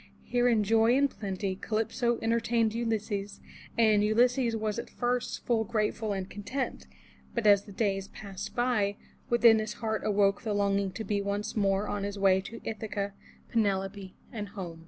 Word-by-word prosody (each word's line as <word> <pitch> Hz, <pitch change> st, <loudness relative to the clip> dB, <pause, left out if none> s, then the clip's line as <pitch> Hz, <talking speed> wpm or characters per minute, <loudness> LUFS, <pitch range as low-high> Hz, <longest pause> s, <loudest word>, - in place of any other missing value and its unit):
Here 245 Hz, 0 st, +1 dB
in 225 Hz, -3 st, +3 dB
joy 225 Hz, +4 st, +4 dB
and 280 Hz, +1 st, +4 dB
plenty 195 Hz, -5 st, -4 dB
Calypso 225 Hz, +4 st, 0 dB
entertained 230 Hz, -1 st, +1 dB
Ulysses, 210 Hz, -3 st, -2 dB, 0.4 s
and 215 Hz, -3 st, +4 dB
Ulysses 240 Hz, +2 st, +3 dB
was 215 Hz, 0 st, -2 dB
at 235 Hz, -, -6 dB
first 245 Hz, 0 st, -2 dB
full 230 Hz, -2 st, +2 dB
grateful 215 Hz, 0 st, -1 dB
and 190 Hz, -2 st, -3 dB
content, 255 Hz, +8 st, -4 dB, 0.5 s
but 235 Hz, -2 st, -1 dB
as 200 Hz, -1 st, +6 dB
the 205 Hz, -, -11 dB
days 195 Hz, -2 st, -1 dB
passed 200 Hz, -2 st, -8 dB
by, 240 Hz, -5 st, +1 dB, 0.3 s
within 235 Hz, -2 st, +6 dB
his 215 Hz, -1 st, -3 dB
heart 220 Hz, 0 st, -2 dB
awoke 200 Hz, -2 st, +2 dB
the 215 Hz, -3 st, -2 dB
longing 200 Hz, -1 st, +1 dB
to 220 Hz, -, -5 dB
be 205 Hz, -1 st, -1 dB
once 200 Hz, +1 st, -3 dB
more 200 Hz, -1 st, +1 dB
on 205 Hz, -, -2 dB
his 200 Hz, 0 st, -3 dB
way 190 Hz, -1 st, +4 dB
to 225 Hz, +4 st, -9 dB
Ith'a 220 Hz, -1 st, -4 dB
ca, 200 Hz, 0 st, -2 dB, 0.4 s
Penelope 195 Hz, -3 st, -1 dB, 0.2 s
and 210 Hz, -3 st, -5 dB
home. 180 Hz, -5 st, -7 dB
210 Hz, 170 wpm, -29 LUFS, 200-230 Hz, 0.5 s, as